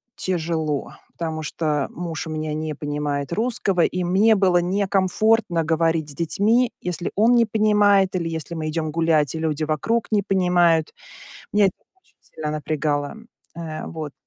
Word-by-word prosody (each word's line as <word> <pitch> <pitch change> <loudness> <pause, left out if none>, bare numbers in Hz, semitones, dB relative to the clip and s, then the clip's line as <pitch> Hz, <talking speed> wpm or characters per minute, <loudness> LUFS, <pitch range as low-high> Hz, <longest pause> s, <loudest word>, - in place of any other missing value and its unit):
тяжело. 160 -5 -2 0.2
Потому 160 -2 -4
что 150 -2 -1
муж 170 -1 -5
у - - -6
меня 155 -1 -3
не 155 0 -3
понимает 145 0 -3
русского, 210 -4 0
и 180 +2 0
мне 200 +5 +4
было 190 -3 +3
некомфортно 195 0 +1
говорить 165 -1 +1
с - - -6
детьми, 215 - +1
если 175 -1 -4
он 225 +4 +4
не 235 -1 +5
понимает, 205 -3 +3
или 170 -2 -1
если 160 +1 -5
мы 155 -1 -3
идем 155 0 -2
гулять, 160 -3 +1
и - - -3
люди 160 -1 -1
вокруг 215 +10 0
не 210 -2 +3
понимают. 180 -4 +2 0.6
Меня 205 -1 +5
это 190 - 0 0.3
очень - - -34
сильно 155 -1 -6
напрягало. 150 +1 -2 0.4
Э, 160 -2 -6
вот. 155 -3 -6
165 Hz, 155 wpm, -22 LUFS, 155-195 Hz, 0.6 s, не